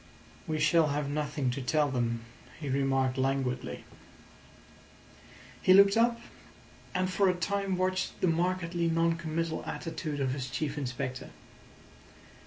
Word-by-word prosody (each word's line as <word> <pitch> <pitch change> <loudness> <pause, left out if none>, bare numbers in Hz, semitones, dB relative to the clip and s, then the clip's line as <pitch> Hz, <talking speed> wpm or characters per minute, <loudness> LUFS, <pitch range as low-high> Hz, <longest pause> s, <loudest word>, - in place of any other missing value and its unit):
"We 155 -1 -1
shall 155 +1 +4
have 145 0 -1
nothing 145 -3 -1
to 135 +2 -4
tell 145 +2 +1
them," 115 -2 -1 0.4
he 145 -3 -4
remarked 135 -1 +1
languidly. 130 -1 -1 1.8
He 185 - +6
looked 200 0 +7
up, 235 +1 +3 0.8
and 185 0 +1
for 190 +1 +2
a 180 - +1
time 195 +1 -1
watched 185 0 -1
the - - +1
markedly 170 0 0
non 165 0 +2
committal 165 0 -3
attitude 160 -3 -4
of 135 -2 0
his 130 -1 -4
Chief 150 -2 -2
Inspector. 130 -2 -4
155 Hz, 130 wpm, -30 LUFS, 135-180 Hz, 1.8 s, looked